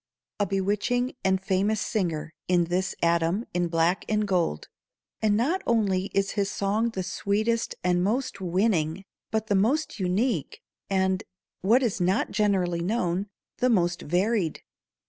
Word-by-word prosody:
A 205 - +1
bewitching 205 +7 0
and 190 0 +2
famous 195 +2 +1
singer 165 -7 -2
is 175 -2 +2
this 185 +2 0
atom 170 +6 +2
in 175 0 +1
black 165 +2 +1
and 210 -1 +1
gold. 175 - 0 0.5
And 210 -1 +3
not 320 +12 +1
only 200 -5 +2
is 195 0 +2
his 200 -1 0
song 205 +4 0
the 190 -5 -4
sweetest 220 +5 -1
and 180 0 +2
most 230 +1 -1
winning, 180 -2 +1 0.3
but 220 -1 -1
the 210 - 0
most 230 +7 +1
unique, 190 - 0 0.3
and 190 +1 +1 0.4
what 230 +8 +4
is 220 -6 -1
not 185 +5 +1
generally 185 -5 +1
known 185 -1 0 0.3
the 250 - +2
most 175 -6 +2
varied. 180 +1 0
195 Hz, 145 wpm, -26 LUFS, 180-220 Hz, 0.5 s, what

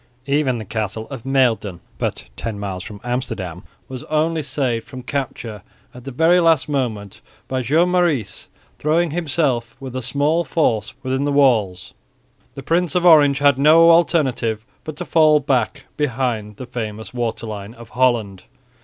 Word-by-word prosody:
Even 140 -3 +1
the 110 - -6
castle 110 +1 -4
of 130 -4 -8
Muiden, 115 -9 +1 0.2
but - - -3
ten 110 -2 -5
miles 95 -2 -5
from 105 +1 -9
Amsterdam, 115 -9 -4 0.3
was 130 -1 -7
only 155 +1 0
saved 125 -6 -2
from 130 -2 -9
capture 120 -5 -4 0.3
at 125 0 -13
the 160 +7 +3
last 165 -4 +3
moment 115 -9 -3 0.3
by 130 -1 -2
Joan 160 +9 +2
Maurice 160 - 0 0.3
throwing 160 +2 +1
himself 140 -8 -1
with 130 -2 -8
a 130 - -2
small 145 +7 +1
force 115 -11 0
within 130 +1 -1
the 145 - 0
walls. 110 -10 +2 0.6
The 135 - -8
Prince 170 +1 0
of 180 0 +1
Orange 145 -5 +6
had 140 -2 +3
no 165 +3 +7
alternative 130 -10 +1 0.2
but 155 - -7
to - - -6
fall 155 -2 +4
back 130 -5 -1
behind 120 -7 -2
the 130 - -8
famous 110 -3 -6
waterline 110 -3 -4
of 115 -1 -13
Holland. 120 -7 0
130 Hz, 155 wpm, -20 LUFS, 110-150 Hz, 0.6 s, no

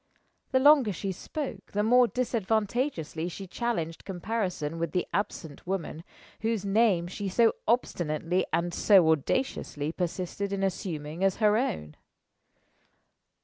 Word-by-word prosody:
The 260 - +4
longer 280 -5 +6
she 195 +2 -3
spoke, 220 - -6
the 205 +1 +1
more 245 +2 +5
disadvantageously 220 - -1
she 195 +3 -7
challenged 180 -5 -3
comparison 180 -5 -3
with 165 -2 -2
the 180 - +1
absent 165 -6 -3
woman, 175 -4 -3 0.4
whose 220 -3 -1
name 200 -4 +3
she 195 +3 -4
so 225 +4 +4
obstinately 175 -6 0
and 170 +1 0
so 185 -6 +5
audaciously 155 - -1
persisted 185 +3 -3
in 195 -1 -1
assuming 170 -4 -3
as 195 -1 +3
her 210 -1 +3
own. 75 - -2
195 Hz, 125 wpm, -28 LUFS, 170-225 Hz, 0.4 s, longer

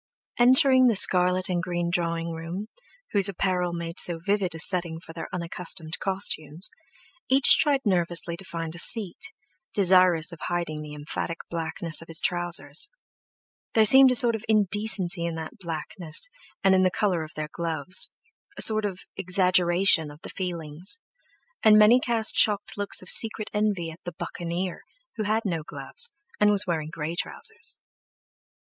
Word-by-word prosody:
Entering 260 +1 +5
the 230 - +2
scarlet 185 -1 +5
and 175 -2 -1
green 175 -1 -3
drawing 170 -1 -2
room, 170 +6 -7 0.4
whose 200 -1 +4
apparel 180 -2 -1
made 170 0 -5
so 170 -2 0
vivid 190 0 -1
a - - -8
setting 170 -2 +1
for 165 -1 -13
their 165 -1 -7
unaccustomed 170 -2 -5
costumes, 190 -2 -1 0.6
each 265 0 +6
tried 285 -3 +2
nervously 175 -3 0
to 185 - -13
find 165 -2 -6
a 170 - -5
seat, 225 - -1 0.4
desirous 180 -3 +4
of 170 - -11
hiding 170 -3 -3
the 150 -1 -9
emphatic 150 +3 -5
blackness 165 -1 -2
of 165 - -13
his 165 -1 -1
trousers. 170 - -1 0.9
There 220 -1 +5
seemed 265 +4 +8
a 250 - +2
sort 235 0 +6
of 220 -1 -5
indecency 200 -4 +3
in 170 -1 -3
that 160 +6 -8
blackness 170 - -4 0.3
and 195 0 +4
in 190 - +3
the 185 - +3
colour 185 -2 -1
of 155 -1 -9
their 155 0 -5
gloves—a 170 - -3
sort 215 -1 +4
of 190 -3 -5
exaggeration 180 -2 +2
of 145 +2 -15
the - - -8
feelings; 170 - -2 0.6
and 215 -1 +6
many 215 +4 +6
cast 230 -3 +1
shocked 205 -1 +2
looks 205 -2 -1
of 185 - -7
secret 220 -1 0
envy 205 -6 -1
at 160 - -14
"the 175 -2 -7
Buccaneer," 175 +1 -5 0.4
who 215 - -2
had 220 +2 -1
no 170 -5 -2
gloves, 475 - -3 0.3
and 210 - +4
was 205 0 +2
wearing 160 -4 -3
grey 160 0 -5
trousers. 445 - -2
180 Hz, 160 wpm, -25 LUFS, 165-210 Hz, 0.9 s, seemed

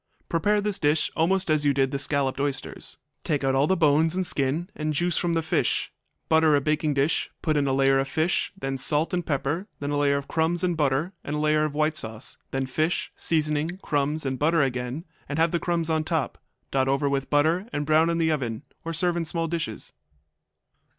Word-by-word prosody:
Prepare 205 +5 +2
this 205 -1 -1
dish 150 +1 +2
almost 185 +4 +2
as 155 -1 +2
you 145 -2 +2
did 135 -1 +2
the 140 - -2
scalloped 140 -1 +1
oysters. 140 -1 -2 0.3
Take 145 -2 -1
out 135 0 +2
all 135 +2 +3
the 190 - +2
bones 160 +1 +3
and 185 0 0
skin 150 +3 0
and 155 0 -2
juice 175 +2 +1
from 170 -1 0
the 165 - 0
fish; 160 - 0 0.4
butter 160 -1 +4
a - - +4
baking 150 +1 0
dish, 140 +3 +1
put 155 -2 +1
in 145 -1 +2
a - - +1
layer 135 0 +3
of 135 - 0
fish, 160 +4 0
then 135 -5 -3
salt 150 +5 +1
and 180 -1 0
pepper, 150 +5 -2
then 145 0 -3
a 145 - 0
layer 140 -1 +2
of 140 - -5
crumbs 165 +2 0
and 175 -2 +1
butter, 150 +4 0
and 145 - -3
a - - -1
layer 155 0 +2
of 150 -1 -4
white 155 +1 +1
sauce, 110 -5 -4
then 135 0 -2
fish, 155 +6 -1
seasoning, 155 +1 0
crumbs 145 +1 0
and 130 -1 -2
butter 160 +1 +3
again, 125 +4 -3 0.2
and 145 - -3
have 165 0 +3
the 170 - 0
crumbs 170 -2 -1
on 160 -1 +1
top. 160 -5 -2 0.3
Dot 135 -1 +1
over 140 +1 +1
with 140 -1 -1
butter 160 +8 +2
and 145 -6 -2
brown 155 +2 +4
in 170 - 0
the 160 -1 +2
oven, 130 -5 -2 0.2
or 165 - -4
serve 175 +2 0
in 170 - -1
small 165 +1 -1
dishes. 165 -1 -4
155 Hz, 215 wpm, -25 LUFS, 140-165 Hz, 0.4 s, butter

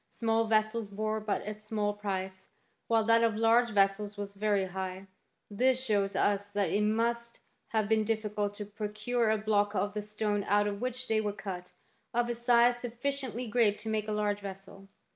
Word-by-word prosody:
Small 225 0 +1
vessels 215 0 +1
bore 215 +2 -2
but 210 -1 -2
a 210 - -2
small 215 -1 -2
price, 190 -2 -4 0.4
while 225 -1 +3
that 230 +1 +4
of 225 -2 +2
large 230 +2 +4
vessels 205 0 +1
was 200 -1 -5
very 205 -1 +1
high; 190 +1 -5 0.4
this 255 +5 +2
shows 205 -6 0
us 205 0 +1
thai; 205 0 +1
it 195 +3 +1
must 235 +2 0 0.3
have 220 -2 0
been 220 0 +3
difficult 210 -2 -1
to 210 - -6
procure 215 +3 -1
a 220 - +3
block 210 -1 +1
of 205 +1 0
the 210 - -2
stone 210 -1 -1
out 205 +1 +3
of 205 -1 -3
which 255 0 -3
they 220 -1 +2
were 205 -1 -2
cut, 185 -3 -7 0.4
of 240 0 +2
a - - +1
size 240 0 +4
sufficiently 250 0 -3
great 220 -2 +3
to 220 - -6
make 215 -1 -1
a - - -2
large 210 -1 0
vessel. 195 0 -9
210 Hz, 185 wpm, -30 LUFS, 205-230 Hz, 0.4 s, that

